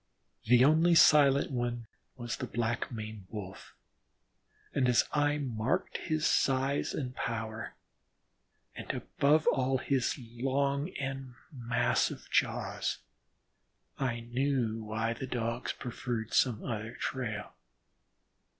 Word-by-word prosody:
The 125 +3 +6
only 160 +4 +5
silent 140 -4 +6
one 120 -2 -2 0.3
was 120 -1 -3
the - - -4
black 120 +1 -2
maned 110 -4 -7
Wolf, 100 -3 -8 1.0
and 130 -2 +2
as 120 - +4
I 145 0 +2
marked 125 -4 -1
his 155 -1 -1
size 135 +1 +1
and 125 -3 -4
power, 110 -1 -4 1.0
and - - -9
above 150 +3 +2
all 130 0 +2
his 130 0 0
long 135 +5 -1
and 135 -2 -5 0.2
massive 120 -3 0
jaws, - - 0 1.0
I 120 -3 -1
knew 120 -2 -1
why 110 +1 -1
the 130 +3 -6
Dogs 120 0 -2
preferred 120 -2 -4
some 120 -5 +2
other 110 0 -4
trail. 110 -6 -4
125 Hz, 110 wpm, -31 LUFS, 115-135 Hz, 1.0 s, The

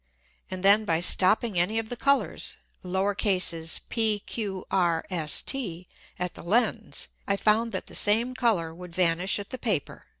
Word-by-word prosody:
And 185 0 -5
then 200 +2 +6
by 165 -6 0
stopping 190 +3 +2
any 210 +6 0
of 225 -1 -3
the 245 - -4
Colours 275 +3 0 1.3
p, 220 -3 +1
q, 195 -5 -4
r, 170 -3 +1
s, 160 -4 +2
t, 185 -10 -3 0.3
at 180 -1 -3
the - - -10
Lens, 220 +8 0 0.2
I 200 - +2
found 220 +3 +2
that 190 - -3
the - - -11
same 230 +4 +2
Colour 205 -11 0
would 175 0 -11
vanish 180 +1 +2
at 200 -1 -8
the 255 - -5
Paper. 205 - -2
200 Hz, 160 wpm, -26 LUFS, 175-225 Hz, 1.3 s, then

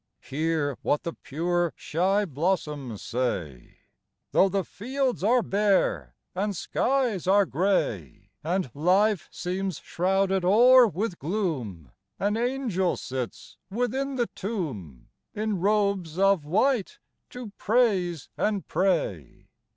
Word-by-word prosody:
Hear 150 -1 -1
what 145 - 0
the 170 - -4
pure, 175 +3 -1
shy 195 +6 0
blossoms 150 - -2
say: 85 - -3 0.3
" - - -55
Though 195 0 +3
fields 250 - -2
arc 240 +2 +3
bare, 190 - +1 0.2
and 200 +2 -2
skies 245 -8 0
are 200 +1 +5
gray, 145 - -1
And 175 -4 -1
life 185 +5 +2
seems 185 -1 -3
shrouded 190 +1 0
o'er 240 +6 +7
with 195 0 -3
gloom, 135 - -3 0.3
An 205 +2 0
angel 235 -7 0
sits 130 -2 -6
within 255 +6 -1
the 245 -2 +1
tomb, 140 - -6 0.3
In 210 -2 -1
robes 200 -5 +1
of 195 -5 +3
white, 215 - +1 0.3
to 245 -4 -8
praise 195 - +1
and 205 -3 -1
pray." 160 - -1
190 Hz, 110 wpm, -26 LUFS, 155-210 Hz, 0.3 s, o'er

